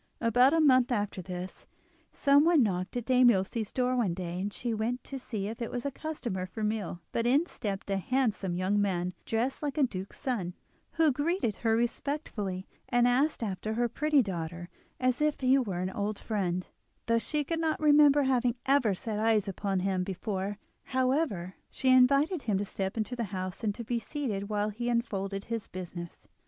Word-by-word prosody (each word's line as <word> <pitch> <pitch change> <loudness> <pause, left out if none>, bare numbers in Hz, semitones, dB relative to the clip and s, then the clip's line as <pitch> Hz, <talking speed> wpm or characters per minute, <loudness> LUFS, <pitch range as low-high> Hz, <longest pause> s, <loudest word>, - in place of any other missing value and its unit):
About 245 +3 +4
a 325 - +3
month 260 -4 +5
after 205 -4 -1
this, 180 +1 -7 0.4
someone 290 +2 +5
knocked 185 +1 -2
at 240 - -3
Dame 255 -1 +6
Ilse's 210 +1 0
door 255 0 +1
one 210 -9 +1
day, 175 -1 -4
and 205 +2 -2
she 235 +2 -3
went 230 +3 -2
to 270 - -6
see 215 -6 -4
if 225 +3 -6
it 235 - -2
was 245 +1 -4
a 280 - -1
customer 240 -12 -4
for 215 +4 -6
meal; 210 -5 -2
but 230 0 0
in 280 +7 +4
stepped 200 - -5
a 195 - +2
handsome 215 -5 0
young 190 +3 +1
man, 180 -3 0 0.2
dressed 235 +4 -1
like 295 0 -3
a 295 - +4
duke's 195 -6 -3
son, 210 -10 -2 0.4
who 320 -2 +4
greeted 290 - 0
her 225 -1 +2
respectfully, 230 -6 -2 0.2
and 245 0 +4
asked 260 +2 +2
after 215 +1 -3
her 240 +1 +2
pretty 295 +3 +2
daughter 175 -2 -5 0.3
as 255 +1 +1
if 300 -1 +1
he 260 +1 +5
were 195 -8 -2
an 185 +1 -2
old 205 +1 -2
friend, 185 -5 -2 0.4
though 230 0 +3
she 295 +7 -1
could 325 +3 -2
not 320 -1 0
remember 295 -1 +6
having 250 -2 +2
ever 265 -7 +3
set 210 +2 -4
eyes 220 -2 +2
upon 195 -1 -1
him 190 -1 0
before. 195 +1 -3 0.3
However, 255 - 0 0.2
she 260 - -1
invited 275 +7 +5
him 210 -6 0
to 205 - -1
step 195 +1 -4
into 220 +3 -2
the 235 -2 -2
house 185 0 -5
and 220 +2 -2
be 235 +1 -1
seated 220 -6 -4
while 210 0 0
he 240 +3 -3
unfolded 195 -4 -1
his 230 -1 -4
business. 175 -2 -8
225 Hz, 190 wpm, -30 LUFS, 195-260 Hz, 0.4 s, Dame